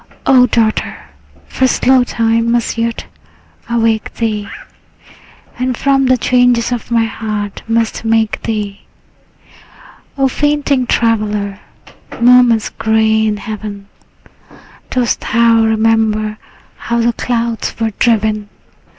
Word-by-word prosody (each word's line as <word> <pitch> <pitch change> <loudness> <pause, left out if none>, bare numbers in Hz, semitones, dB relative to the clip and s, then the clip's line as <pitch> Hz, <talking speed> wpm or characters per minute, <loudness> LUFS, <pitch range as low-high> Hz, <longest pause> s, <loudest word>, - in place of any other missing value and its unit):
O 255 -2 +5
daughter, 220 -2 0 0.5
for 260 - 0
slow 255 +1 +3
time 230 -1 0
must 235 -1 0
yet 230 0 -3 0.6
awake 225 -2 0
thee, 215 -3 -2 1.1
And 255 -1 -1
from 270 -1 +2
the 255 0 +3
changes 245 -1 +2
of 240 -2 -4
my 230 -1 +2
heart 215 -2 -5
must 225 0 -1
make 225 -1 0
thee! 210 -3 -4 1.4
O 270 -1 +3
fainting 285 -2 0
traveller, 210 -4 0 0.6
morn 245 0 +6
is 220 -2 0
gray 220 0 +1
in 210 -1 -1
heaven. 205 -1 -7 1.0
Dost 245 -3 0
thou 230 0 +3
remember 220 -1 +1 0.4
how 235 0 -2
the 235 0 +1
clouds 235 -1 -2
were 225 -1 0
driven? 215 -3 +1
230 Hz, 110 wpm, -14 LUFS, 215-240 Hz, 1.4 s, morn